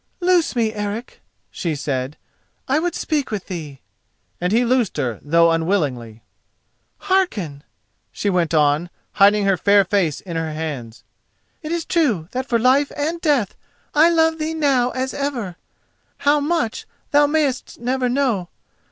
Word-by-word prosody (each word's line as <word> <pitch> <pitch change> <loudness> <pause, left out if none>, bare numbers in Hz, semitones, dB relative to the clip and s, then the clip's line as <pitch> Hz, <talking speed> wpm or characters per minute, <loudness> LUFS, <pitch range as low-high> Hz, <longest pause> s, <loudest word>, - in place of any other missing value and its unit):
"Loose 355 -5 +2
me, 225 -2 +1
Eric," 210 +3 -5 0.3
she 165 -5 -3
said; 140 -1 -3 0.5
"I 275 +3 +2
would 350 +1 -2
speak 300 -4 -1
with 210 -4 -4
thee," 155 -7 -7 0.6
and 180 +1 0
he 235 +3 +3
loosed 240 -6 +1
her, 120 -7 -2
though 170 +2 +4
unwillingly. 145 - -1 0.8
"Hearken," 205 - 0 0.5
she - - -4
went 180 -4 +1
on, 150 +3 +2 0.2
hiding 205 0 +4
her 195 -2 +3
fair 200 +1 +4
face 180 -6 0
in 170 -3 -6
her 160 -1 -2
hands: 140 -8 -6 0.6
"it 310 -1 -6
is 340 -1 -2
true 235 - +1
that 255 +1 -3
for 235 - +2
life 260 +5 +3
and 320 +4 -2
death 285 - +1 0.4
I 310 +3 +6
love 325 -1 +2
thee 315 +1 -2
now 275 -5 +2
as 260 +1 -3
ever—how 280 +3 -3
much 295 -6 -1 0.2
thou 290 0 +5
mayest 290 -4 -1
never 250 +1 0
know. 240 -9 0
220 Hz, 145 wpm, -21 LUFS, -, 0.8 s, I